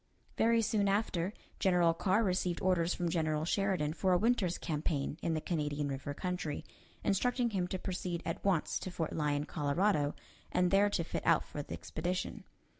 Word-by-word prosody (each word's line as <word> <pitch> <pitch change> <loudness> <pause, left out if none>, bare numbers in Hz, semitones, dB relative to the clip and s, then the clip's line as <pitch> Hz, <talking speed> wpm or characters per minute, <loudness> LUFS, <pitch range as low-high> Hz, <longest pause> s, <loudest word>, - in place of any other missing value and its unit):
Very 230 0 +3
soon 210 -2 +2
after, 195 -3 +1 0.3
General 175 -3 +4
Carr 190 +6 +2
received 180 -3 0
orders 180 -2 +2
from 175 -2 -1
General 155 -2 0
Sheridan 185 -5 +1
for 185 +2 +2
a - - +5
winter's 210 -4 +2
campaign 150 -1 -2
in 165 - 0
the 155 - -1
Canadian 150 -4 -1
River 140 +1 -4
country, 180 -4 -3 0.4
instructing 245 +4 +1
him 185 -3 0
to 185 - -3
proceed 180 -2 -3
at 165 - -3
once 190 -6 +1
to - - -5
Fort 165 -3 -3
Lyon, 150 -1 0
Colorado, 150 +1 +1 0.4
and 180 0 +2
there 200 +1 +5
to 180 -4 0
fit - - -3
out 165 -1 +4
for 145 - -5
the - - -7
expedition. 180 +3 -3
180 Hz, 175 wpm, -33 LUFS, 155-195 Hz, 0.4 s, a